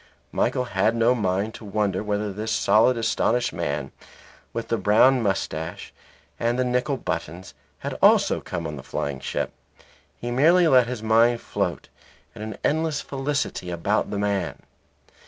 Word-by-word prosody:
Michael 125 - 0
had 115 -2 +1
no 115 +2 +4
mind 105 -1 -1
to - - -11
wonder 100 -2 -1
whether 105 -1 -2
this 110 +3 -4
solid 110 +5 +4
astonished 115 0 +1
man, 75 -4 -3 0.6
with 115 0 -5
the 115 - +1
brown 125 +5 +5
moustache 90 -6 -3 0.5
and 120 +1 0
the 130 - +1
nickel 125 +3 0
buttons, 85 -1 -5 0.2
had - - -5
also - - +4
come - - -5
on 75 -2 -5
a - - -7
flying 70 +1 -4
ship. - - -3 0.7
He 120 - -5
merely 165 +8 +5
let 130 -5 +5
his 120 -3 -5
mind 115 +2 +4
float - - -3 0.5
in - - -10
an 110 -1 -6
endless 160 -1 +1
felicity 140 -8 -3
about 90 +5 0
the 100 - -3
man. 100 -3 -2
110 Hz, 155 wpm, -24 LUFS, 95-125 Hz, 0.7 s, brown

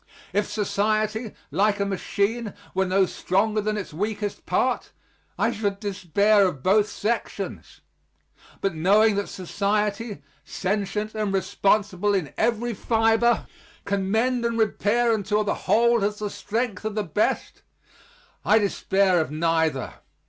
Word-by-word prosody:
If 205 +1 0
society, 215 +1 -1 0.2
like 205 +1 +2
a 200 - +1
machine, 200 +3 -2 0.2
were 190 0 +1
no 190 +1 +3
stronger 210 +4 0
than 215 +1 -1
its 195 -6 -6
weakest 205 +3 -3
part, - - 0 0.5
I 230 - +2
should 205 -3 -2
despair 200 0 +2
of 145 -7 -5
both 205 +2 +3
sections. 225 +3 -4 0.8
But, 195 -2 0
knowing 205 +7 +4
that 200 - -2
society, 205 0 -2 0.2
sentient 205 +2 -2
and 215 -2 -1
responsible 200 +1 +1
in 170 -7 -2
every 235 +1 0
fiber, 225 +2 +2 0.4
can 195 -1 -1
mend 240 +3 +1
and 235 0 0
repair 225 +2 +2
until 210 0 0
the 205 - 0 0.2
whole 235 0 +4
has 210 +1 0
the 210 -1 -4
strength 225 -3 -3
of 215 -1 -3
the 215 - 0
best, 200 +4 -1 0.8
I 215 - +5
despair 195 -3 +2
of 155 - -3
neither. 160 -3 0
205 Hz, 135 wpm, -24 LUFS, 195-220 Hz, 0.8 s, I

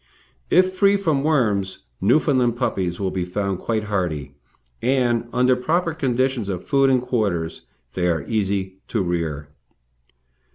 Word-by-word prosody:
If 185 +1 +4
free 200 +1 +4
from 160 -8 0
worms, 105 - 0 0.2
Newfoundland 125 0 +3
puppies 90 -6 -1
will 95 -2 -1
be 95 - -2
found 95 +1 -2
quite 110 -2 -1
hardy, 85 -9 -2 0.5
and, 120 -2 +1
under 125 +1 +3
proper 165 +6 0
conditions 130 -6 0
of 90 -2 -4
food 135 -1 +3
and 130 -1 +4
quarters, 100 -10 -2 0.3
they 90 -1 0
are 80 -4 0
easy 95 -3 -1
to 110 -5 -1
rear. 80 -5 -3
110 Hz, 135 wpm, -22 LUFS, 95-130 Hz, 0.5 s, If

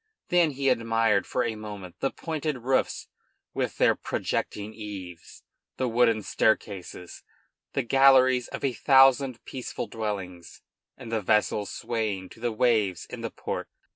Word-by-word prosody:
Then 175 -2 +4
he 135 +1 -2
admired 115 -4 +2
for 125 - 0
a 115 - -1
moment 100 -5 -9
the 135 - +1
pointed 155 -6 -4
roofs 130 +1 0 0.5
with - - -2
their - - +4
projecting 105 +1 -3
eaves, 95 -6 -9 0.3
the 130 - 0
wooden 115 -2 +2
staircases, 95 -5 -1 0.5
the 135 - 0
galleries 130 0 +5
of - - -7
a 135 -2 +1
thousand 135 -1 +4
peaceful 130 -2 -5
dwellings, 100 -6 -6 0.3
and 120 -4 -9
the 110 -1 0
vessels 105 0 +1
swaying 105 -5 -3
to - - -15
the 120 0 -1
waves 110 -5 +1
in - - -6
the - - -3
port. - - -5
115 Hz, 140 wpm, -27 LUFS, 105-130 Hz, 0.5 s, galleries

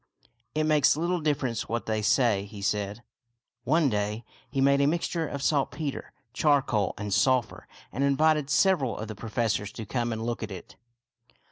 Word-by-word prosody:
" 120 +2 -46
It 155 - +1
makes 150 -2 +4
little 175 +2 0
difference 140 -6 -1
what 115 +1 -2
they 110 -1 -1
say," 110 -2 +2
he 100 -1 -10
said. 105 +2 -2 0.6
One 155 +4 +3
day 105 0 -2 0.2
he 135 - -3
made 140 +1 +4
a 140 - +4
mixture 165 0 -1
of 140 -1 -5
saltpeter, 145 0 -1 0.2
char 145 -3 +3
coal, 105 -7 -1
and 105 -1 -3
sulphur, 115 +4 +1 0.2
and 135 - -2
invited 150 +1 +2
several 145 - +2
of 110 - -5
the 110 - -5
pro 110 +2 -8
fessors 110 -3 -1
to 110 - -7
come 120 +2 -2
and 110 0 -3
look 120 0 -3
at 110 - -4
it. 95 -3 -10
120 Hz, 180 wpm, -27 LUFS, 110-145 Hz, 0.6 s, makes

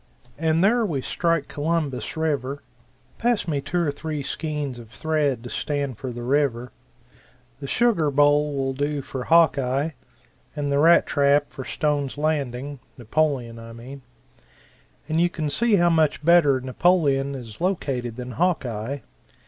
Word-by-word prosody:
"And 160 +1 +2
there 235 +4 +4
we 165 -10 -1
strike 165 +1 0
Columbus 150 -3 -2
River 140 -3 -2 0.6
pass 235 -5 +1
me 145 -4 -1
two 175 +4 -1
or 145 - +1
three 150 0 -5
skeins 150 -4 -4
of 115 -2 -12
thread 145 -3 -1
to 120 - -7
stand 140 -6 -3
for 130 - -4
the 120 0 -7
river; 125 -2 0 0.9
the 140 - -6
sugar 205 - +2
bowl 145 +1 +3
will 135 -1 -1
do 145 +1 -2
for 130 -1 -6
Hawkeye, 145 -3 +3 0.6
and 145 -1 -2
the 140 - +2
rat 170 +3 +6
trap 145 0 +2
for 130 - -7
Stone's 145 -3 -1
Landing 145 -3 -2 0.2
Napoleon, 125 -2 -1
I 115 0 -10
mean 130 +4 -10 1.1
and 160 +1 +1
you 175 - +3
can 155 -4 -3
see 225 +7 +2
how 175 -2 +4
much 155 -2 +1
better 160 -6 +5
Napoleon 140 0 +1
is 115 -3 -9
located 135 - -1
than 125 0 -6
Hawkeye. 135 -5 -1
145 Hz, 150 wpm, -24 LUFS, 130-160 Hz, 1.1 s, rat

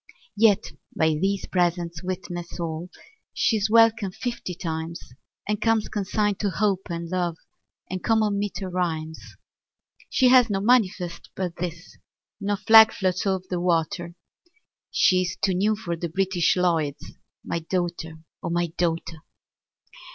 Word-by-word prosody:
Yet 215 -1 +3 0.3
by 160 - +3
these 190 +6 0
presents 175 -2 -1
witness 180 -1 -6
all 165 +1 -4 0.5
She's 220 -2 +1
welcome 225 -3 +4
fifty 235 -4 -5
times, 165 -1 -4 0.5
And 210 0 -1
comes 225 -1 +1
consigned 205 0 -1
to 205 - 0
Hope 195 -1 0
and 170 0 -4
Love 175 -2 -2 0.5
And 185 0 -5
common 215 -3 +2
meter 200 -1 -3
rhymes. 160 -3 -3 0.9
She 255 - +4
has 250 -2 +6
no 195 -2 0
manifest 195 -6 +1
but 180 -3 -4
this, 170 0 -6 0.4
No 205 0 -1
flag 220 +2 +7
floats 185 0 -1
o'er 190 -1 +1
the 180 -2 -2
water, 170 0 -1 0.7
She's 185 -1 +2
too 190 - +1
new 205 +4 +2
for 185 -5 -4
the 170 +1 -4
British 185 0 +1
Lloyds 165 -6 0 0.3
My 170 - -2
daughter, 170 -2 -3 0.2
O - - -3
my 170 -1 0
daughter! 165 -1 -1
185 Hz, 135 wpm, -25 LUFS, 170-205 Hz, 0.9 s, flag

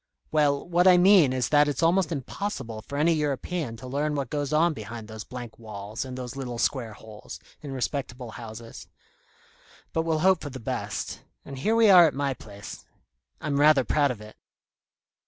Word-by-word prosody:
"Well, 145 -1 +2
what 175 +1 +3
I 180 -1 +8
mean 180 -6 +6
is 130 -1 -1
that 145 0 +5
it's 145 +2 -1
almost 170 0 +3
impossible 135 - -4
for 140 +6 -7
any 160 +3 +3
European 150 -3 -2
to 115 - -10
learn 145 +3 -1
what 140 -2 -3
goes 145 -2 -2
on 160 +2 +3
behind 110 -2 -8
those 110 -1 -7
blank 120 -1 -9
walls 105 -1 -6
and 130 -1 -7
those 125 -1 -6
little 125 -3 -5
square 120 -2 -1
holes, 105 0 -11 0.2
in 145 - -7
respectable 125 -2 -4
houses. 115 0 -9 1.1
But 160 - +1
we'll 160 -1 0
hope 190 -2 +4
for 145 - -5
the 130 -1 -8
best. 115 - -4 0.2
And 135 -1 -8
here 220 +11 +1
we 225 -3 +6
are 175 -3 +9
at 150 - -3
my 140 -1 0
place. 100 -4 -10 0.6
I'm 145 -3 -1
rather 150 -2 +6
proud 145 +2 +2
of 120 -5 -5
it." 105 0 -12
140 Hz, 185 wpm, -26 LUFS, 120-155 Hz, 1.1 s, are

